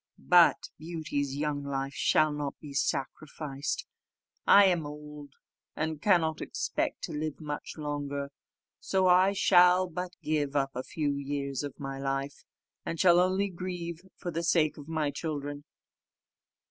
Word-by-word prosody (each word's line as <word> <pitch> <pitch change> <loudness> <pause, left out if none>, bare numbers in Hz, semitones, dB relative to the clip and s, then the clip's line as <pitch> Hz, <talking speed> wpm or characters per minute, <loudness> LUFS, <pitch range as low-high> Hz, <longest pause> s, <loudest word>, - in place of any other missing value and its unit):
But 175 -1 +4
Beauty's 155 -4 -3
young 145 -1 -2
life 135 0 -3
shall 155 +1 +3
not 145 -1 -4
be 145 -2 -10
sacrificed: 140 - -3 0.6
I 200 0 +8
am 175 -5 +2
old, 150 -1 -10 0.4
and 155 -1 -3
cannot 165 -6 +2
expect - - -2
to - - -4
live 155 0 -3
much 150 0 -6
longer; 145 -2 -4 0.5
so 190 -1 +1
I 185 +2 +5
shall 180 -1 +5
but 180 +1 -5
give 145 -2 -1
up 135 -1 +1
a 125 - -2
few 145 +2 -2
years 140 -1 -3
of 145 -2 -7
my 135 -1 -5
life, 135 +1 -3 0.4
and 165 - -4
shall 175 -2 +6
only 190 +2 +2
grieve 175 -2 -5 0.2
for 175 - -5
the 165 +1 -2
sake 165 -2 +2
of 145 -1 -10
my 155 -3 -1
children." 145 -2 -5
150 Hz, 145 wpm, -29 LUFS, 140-175 Hz, 0.6 s, I